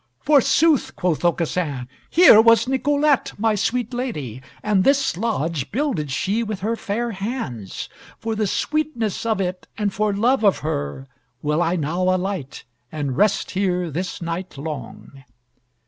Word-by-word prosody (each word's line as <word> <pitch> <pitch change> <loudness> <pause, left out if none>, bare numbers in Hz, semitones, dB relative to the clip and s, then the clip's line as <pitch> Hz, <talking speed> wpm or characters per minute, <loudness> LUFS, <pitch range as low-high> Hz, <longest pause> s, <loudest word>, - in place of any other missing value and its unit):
"Forsooth!" 300 +1 +3
quoth 175 -3 -1
Aucassin, 165 -6 -1 0.2
"here 330 -11 +8
was 230 0 +5
Nicolette, 285 +1 +1
my 220 +1 +2
sweet 240 +3 -1
lady, 150 - -4 0.2
and 210 -3 +2
this 275 -5 +2
lodge 165 - -2
builded 235 - -1
she 195 +11 0
with 215 -4 -4
her 225 +4 0
fair 230 +2 -3
hands. 195 - -5 0.3
For 225 0 -3
the 215 -1 0
sweetness 240 -5 -1
of 220 -3 +1
it, 185 -1 -3
and 205 -3 -1
for 210 0 +1
love 230 +5 +2
of 200 -2 +4
her, 70 - -3 0.4
will 150 +2 +1
I 175 +1 +1
now 165 +2 -2
alight, 185 -5 -1 0.3
and 145 -4 -3
rest 205 +4 +2
here 180 -3 0
this 180 +3 -4
night 170 -1 -5
long." 140 -2 -7
195 Hz, 145 wpm, -22 LUFS, 165-230 Hz, 0.4 s, here